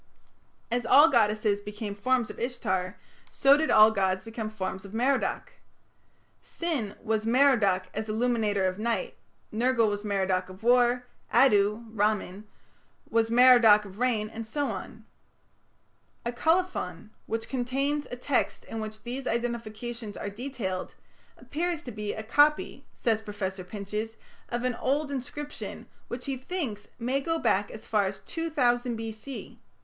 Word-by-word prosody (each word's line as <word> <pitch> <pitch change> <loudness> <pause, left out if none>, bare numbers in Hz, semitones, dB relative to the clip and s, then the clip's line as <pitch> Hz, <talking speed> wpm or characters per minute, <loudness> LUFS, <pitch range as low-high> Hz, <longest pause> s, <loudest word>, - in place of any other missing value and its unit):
As 245 +1 0
all 290 +7 +7
goddesses 215 -3 +2
became 210 0 -5
forms 245 +3 0
of - - -12
Ishtar, 190 -7 -2 0.3
so 275 +1 +5
did 315 +2 0
all 215 +1 +7
gods 190 -2 0
become 225 0 -5
forms 190 -3 -4
of 200 +2 -9
Merodach. 260 +4 0 0.9
Sin 285 -12 -3
was 220 0 0
"Merodach 230 -7 +4
as 220 +1 -4
illuminator 215 -3 +1
of 185 +1 -1
night", 235 - -1 0.4
Nergal 230 0 +3
was 205 0 -3
"Merodach 190 -3 0
of 185 +3 -12
war", 245 +1 +4 0.3
Addu 210 -3 +4
(Ramman) 210 -1 0 0.7
was 225 0 +2
"Merodach 235 -3 +7
of 195 +1 -11
rain", 235 -4 +1
and 225 +1 -7
so 285 +5 -1
on. - - -8 1.2
A 235 - 0
colophon 245 - 0 0.2
which 225 0 -3
contains 275 +3 -1
a - - -4
text 250 +1 -1
in 225 - -6
which 215 0 -7
these 250 +3 -5
identifications 235 -1 -3
are 205 - -4
detailed, 215 -5 -4 0.4
appears 335 +1 -3
to 245 - -7
be 210 -1 -4
"a 220 - -5
copy", 290 +7 +2
says 220 -2 0
Professor 195 -3 -4
Pinches, 210 +3 -5 0.3
"of 240 0 -2
an 250 0 +1
old 285 +4 -1
inscription", 285 +2 -6 0.2
which, 245 +1 -6
he 270 -1 -2
thinks, 260 - -4
"may 255 +3 0
go 330 +3 0
back 205 -9 +1
as 220 +1 -10
far 210 -2 +2
as 195 0 -4
2000 245 -3 0
B.C. 225 +4 -7
225 Hz, 145 wpm, -28 LUFS, 210-255 Hz, 1.2 s, all